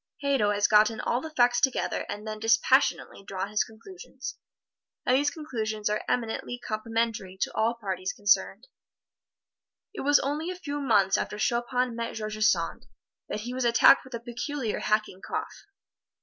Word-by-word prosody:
Hadow 270 -7 +2
has 205 0 +1
gotten 215 +1 +4
all 240 +2 0
the 320 - -6
facts 245 -4 +3
together 265 -1 0
and 210 +1 -5
then 215 0 -5
dispassionately 225 +2 +2
drawn 195 0 -4
his 210 - +2
conclusions; 365 - -10 0.7
and 255 - +4
these 290 +2 +3
conclusions 220 -9 -3
are 210 - -1
eminently 245 0 -2
complimentary 220 -4 -3
to - - -1
all 225 +2 +1
parties 190 -4 -3
concerned. 205 0 +1 1.3
It - - -5
was 290 +1 +5
only 300 +5 -2
a 365 - -4
few 290 -5 -5
months 205 -7 +3
after 210 - -4
Chopin 240 +2 0
met 230 0 -4
George 215 0 -3
Sand - - +1 0.4
that 210 - -3
he 245 +3 -5
was 260 0 -2
attacked 240 +3 +6
with 260 -2 -8
a - - -4
peculiar 240 +1 -4
hacking 215 -3 -1
cough. - - -6
230 Hz, 160 wpm, -27 LUFS, 215-260 Hz, 1.3 s, attacked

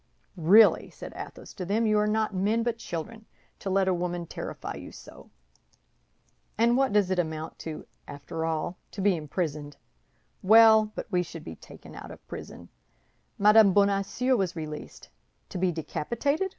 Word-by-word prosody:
"Really," 195 +6 +5
said - - -10
Athos - - -9
to 185 - -6
them, 210 +5 0
"you 215 -1 +3
are 210 - +1
not 215 0 0
men 210 +5 +1
but 235 -1 -2
children, 220 +5 -7 0.3
to 195 - -5
let 190 0 +2
a 190 - +3
woman 175 0 -3
terrify - - -6
you - - -9
so! - - -14 1.3
And 235 +2 +3
what 270 0 +2
does 200 -2 +2
it 185 - +1
amount 160 -1 -4
to, 160 -1 -7 0.2
after 145 +3 -6
all? 165 +2 -2
To 200 - -5
be 195 -1 +3
imprisoned. 150 -2 -4 0.6
Well, 220 +1 +6
but - - -4
we 180 -2 +2
should 165 -2 -8
be 80 - -8
taken - - -14
out - - -9
of - - -13
prison; - - -9 0.7
Madame 210 -1 +6
Bonacieux 200 +6 +2
was 190 -6 -1
released. 155 -2 -8 0.4
To 180 - -5
be 185 0 +2
decapitated? 240 - -2
190 Hz, 165 wpm, -27 LUFS, 165-220 Hz, 1.3 s, Well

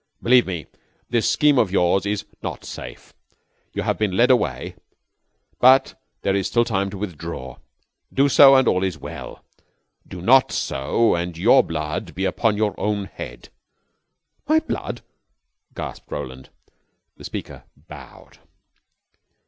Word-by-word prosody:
Believe 125 -2 +5
me, 85 -5 -4 0.5
this 120 -2 +2
scheme 145 -3 +3
of 100 -6 +2
yours 95 +1 +2
is 105 -1 -2 0.2
not - - -6
safe. - - -10 0.6
You - - -3
have - - -1
been 100 -4 0
led 125 +2 +5
away, 125 - 0 0.9
but 130 +2 +5 0.3
there 95 - +1
is 100 -2 0
still 120 0 +2
time 100 -4 -1
to 100 - -8
withdraw. 85 -9 -6 0.5
Do 140 +1 +3
so, 135 0 +7
and 130 -2 +4
all 90 - +2
is 95 -4 -2
well. - - -9 0.6
Do 90 - -9
not 130 +9 +4
so, 70 +13 0
and 85 -1 -3
your 115 +9 +5
blood 75 -1 -5
be - - -2
upon 110 -2 0
your 105 -1 0
own 105 -1 -1
head." - - -10 1.0
"My 310 +2 +4
blood!" 320 - -5 0.7
gasped - - -8
Roland. 65 0 -7 0.7
The - - -13
speaker - - -7
bowed. 75 -3 -14
100 Hz, 140 wpm, -22 LUFS, 85-120 Hz, 1.0 s, so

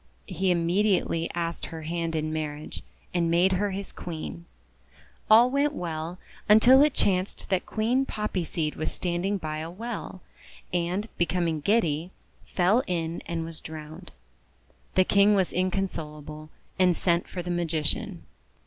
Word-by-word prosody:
He 185 0 -1
immediately 175 -1 +2
asked 170 -1 -3
her 160 -1 -7
hand 165 0 -2
in 155 0 -1
marriage, 150 -1 -4 0.3
and 170 -2 +1
made 175 +3 +4
her 200 +2 +1
his 195 +1 -5
Queen. 170 0 -7 0.8
All 235 +3 +7
went 285 +2 +2
well, 165 - -4 0.3
until 245 +5 +8
it 295 -1 +4
chanced 185 0 0
that 190 -2 0
Queen 245 +5 +1
Poppy 210 -4 -2
Seed 155 -2 -2
was 155 - -2
standing 180 +3 -1
by 155 -3 -4
a 160 +1 -5
well, 205 -1 -6 0.5
and, 180 +4 0
be 175 - +3
coming 170 -3 0
giddy, 170 -3 +1 0.5
fell 195 +7 +4
in 170 -2 -2
and 165 -1 -2
was 165 -1 -7
drowned. 155 0 -9 0.8
The 185 - +6
King 200 +2 +5
was 190 -3 +1
inconsolable, 155 -5 -3 0.3
and 180 -2 +5
sent 170 0 +1
for 180 - -5
the 175 - -3
Magician. 175 +4 -1
175 Hz, 145 wpm, -27 LUFS, 165-200 Hz, 0.8 s, until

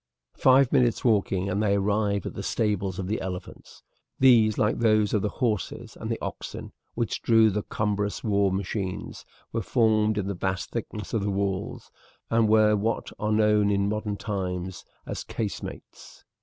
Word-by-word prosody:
Five 130 0 +4
minutes' 120 -1 +2
walking 100 -4 +2
and 100 +2 -1
they 100 -2 +2
arrived 100 0 0
at - - -4
the - - -5
stables 100 -4 -1
of 95 - -3
the 110 +3 -2
elephants. 90 -1 -8 0.3
These, 115 -5 +5
like 105 - +1
those 110 -3 +3
of 105 - +2
the 105 - 0
horses 110 -5 -3
and - - -6
the - - -1
oxen - - -6 0.2
which 115 -2 -2
drew 115 -2 +5
the 105 +2 -1
cumbrous 105 0 -2
war 100 -3 +2
machines, 95 0 -4 0.3
were 115 - 0
formed 110 -1 +2
in 105 - -1
the 100 - -2
vast 95 0 -3
thickness 110 -2 -5
of 110 - +1
the 100 - -1
walls, 100 0 -3 0.4
and 115 -1 +3
were 110 -1 +5
what 110 +3 -2
are 105 0 -1
known 105 -1 +3
in 100 0 +1
modern 105 -1 -2
times 95 -3 -4 0.2
as - - -5
casemates. 105 -3 -7
105 Hz, 170 wpm, -26 LUFS, 100-110 Hz, 0.4 s, These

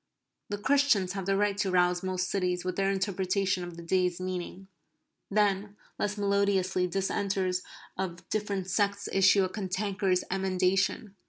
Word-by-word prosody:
The 205 - -2
Christians 220 -6 +2
have 195 -1 -4
the 195 0 +2
right 205 0 +2
to 195 - +1
rouse 180 -1 +2
most 185 -1 -1
cities 180 -2 -1
with 185 -1 -2
their 195 0 +1
interpretation 190 -1 0
of 175 -1 -8
the 170 - -8
day's 180 0 +1
meaning. 185 +1 -5 0.6
Then, 205 0 +1 0.2
less 205 0 -1
melodiously, 200 -2 +1
dissenters 190 0 -1 0.4
of 175 -2 -4
different 200 -3 -2
sects 200 +1 0
issue 195 0 +5
a - - +1
cantankerous 190 -1 -1
emendation. 190 +2 0
190 Hz, 145 wpm, -29 LUFS, 185-200 Hz, 0.6 s, issue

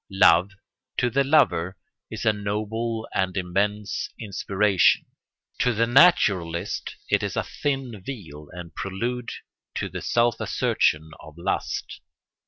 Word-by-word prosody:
Love, 95 -1 +5 0.4
to 120 - +1
the 140 +3 +3
lover, 95 - +2 0.3
is - - -5
a 110 - +4
noble 110 +2 -3
and 95 0 0
immense 100 +3 -1
inspiration; 100 -2 +2 0.5
to 125 - +2
the 115 +2 +3
naturalist 100 - +3
it - - +2
is - - -3
a - - 0
thin 135 -7 -3
veil 80 - -8
and 90 -2 -9
prelude 120 +7 -3 0.5
to - - -2
the - - -6
self 120 -1 +2
assertion 80 +1 +1
of 75 0 -13
lust. 90 +3 -3
100 Hz, 125 wpm, -25 LUFS, 90-120 Hz, 0.5 s, Love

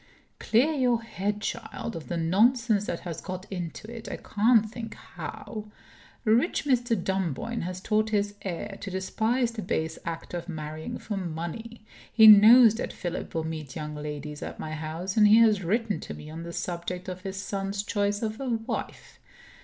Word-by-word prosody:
"Clear 250 +8 +3
your 245 -5 +2
head, 210 -1 -3
child, 230 0 -4
of 165 - -7
the 175 - -2
nonsense 210 +5 +3
that 170 - -3
has 165 -3 -6
got 185 0 -6
into 180 +2 -5
it 230 - -7
I - - -4
can't 220 +1 +3
think 225 0 -7
how. 215 -1 -7 0.6
Rich 235 +9 +2
Mr. 245 -4 +2
Dunboyne 190 - -2
has 180 +1 -4
taught 215 +1 +1
his 205 -1 0
heir 195 +2 -5
to 200 - -5
despise 220 +6 0
the 225 -1 -5
base 160 -4 -2
act 165 -1 -6
of 175 +1 -5
marrying 155 -1 -5
for 210 -2 -5
money. 185 +7 -5 0.3
He 220 - +7
knows 220 +2 +10
that - - -3
Philip 175 -1 -5
will 160 - 0
meet 155 -4 -6
young 150 -1 -5
ladies 150 0 -6
at - - -6
my 155 - -5
house; 160 +6 -4
and 210 -1 +7
he 215 +2 +7
has 220 -4 +5
written 215 +4 0
to - - -7
me 150 - -10
on 165 +1 -6
the 170 0 -6
subject 175 +1 -4
of 185 0 -5
his 190 0 -5
son's 195 +1 -3
choice 205 0 0
of 220 +3 -3
a 265 - -2
wife. 225 -1 -4
200 Hz, 180 wpm, -27 LUFS, 170-225 Hz, 0.6 s, knows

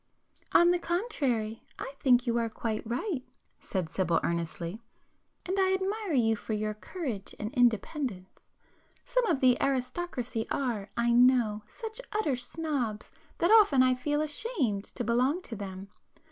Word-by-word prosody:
"On 345 0 +6
the 355 - +2
contrary, 275 - -1 0.2
I 270 - -6
think 245 -2 +4
you 235 -1 +1
are 230 -1 0
quite 220 0 -3
right"—said 245 - -4
Sibyl 170 0 +1
earnestly—"And 175 - -5
I 380 0 +3
admire 390 0 -2
you 225 -4 +3
for 220 - -5
your 215 0 -1
courage 225 - -5
and 215 +2 -5
independence. 235 - 0 0.6
Some - - +1
of 315 -7 +1
the 250 -2 +5
aristocracy 255 -3 -1
are, 235 -7 -2
I 235 0 +2
know, 240 -3 +4
such 450 0 -7
utter 420 -11 +1
snobs 250 -4 -3 0.3
that 345 - +2
often 400 -13 +7
I 255 0 +4
feel 295 +4 -1
ashamed 295 - -1
to - - -5
belong 255 - +1
to 230 - -7
them. 195 -1 -7
250 Hz, 140 wpm, -29 LUFS, 220-330 Hz, 0.6 s, often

